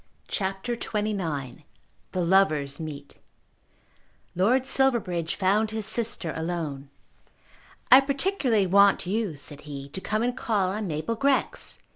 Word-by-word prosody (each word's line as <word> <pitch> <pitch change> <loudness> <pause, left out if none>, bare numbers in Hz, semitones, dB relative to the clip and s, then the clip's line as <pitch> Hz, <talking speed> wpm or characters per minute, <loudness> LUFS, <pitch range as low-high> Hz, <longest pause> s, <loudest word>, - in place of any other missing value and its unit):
CHAPTER 195 +5 -2
XXIX 185 - -3 0.5
The 180 -2 -1
Lovers 155 -7 +2
Meet 145 -3 -8 1.2
Lord 240 +9 +2
Silverbridge 230 -12 +1
found 205 +3 +2
his 220 -1 -3
sister 220 -9 -1
alone. 160 -4 -4 1.0
"I 260 - +11
particularly 275 - +1
want 200 +1 +4
you," 200 -2 -1
said 145 +1 -8
he, 140 -2 -8
"to 190 - -6
come 215 +3 -1
and 245 0 0
call 205 -7 0
on 210 +1 -3
Mabel 160 +7 -2
Grex. 275 +4 -1
195 Hz, 120 wpm, -26 LUFS, 160-230 Hz, 1.2 s, I